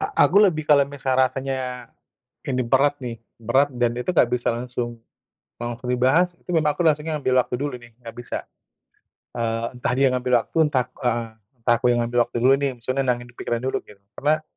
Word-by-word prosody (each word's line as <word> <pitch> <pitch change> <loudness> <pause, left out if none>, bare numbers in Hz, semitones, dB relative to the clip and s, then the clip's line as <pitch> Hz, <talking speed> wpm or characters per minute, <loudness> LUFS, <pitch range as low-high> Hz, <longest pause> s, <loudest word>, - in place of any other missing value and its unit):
a 395 - 0 0.2
aku - - -1
lebih 155 -3 -3
kalau 145 -2 +6
misal 135 -2 -2
rasanya 130 -1 -2 0.6
ini 130 -2 0
berat 140 +4 +3
nih, 120 -2 -5 0.2
berat 130 +6 +2
dan 120 -1 +1
itu 125 +9 -2
nggak 160 -8 +4
bisa 125 -1 0
langsung 120 0 -4 0.6
langsung 120 +1 -4
dibahas, 130 +9 +3
itu - - -34
memang 150 -2 +3
aku 175 - -4
langsungnya 155 0 0
ngambil 130 -2 0
waktu 125 - -4
dulu 145 -2 -3
nih, 120 -1 -13
nggak 115 -1 -10
bisa. 120 0 -6 0.9
Eee, 115 -1 -1
entah 125 - -1
dia 135 0 +3
ngambil 125 0 -1
waktu, - - -20
entah 130 -4 +1
ku - - -25
eee, 120 -1 0 0.4
entah 120 +1 +4
aku 120 - -1
yang 120 - +2
ngambil 120 0 +1
waktu - - -8
dulu 130 +2 +6
nih, 140 -1 0
maksudnya 130 +3 -2
nenangin 120 -1 -1
pikiran 120 0 -2
dulu 130 - -1
gitu. 105 - -16 0.2
Karena 155 +2 +1
125 Hz, 200 wpm, -23 LUFS, 120-140 Hz, 0.9 s, kalau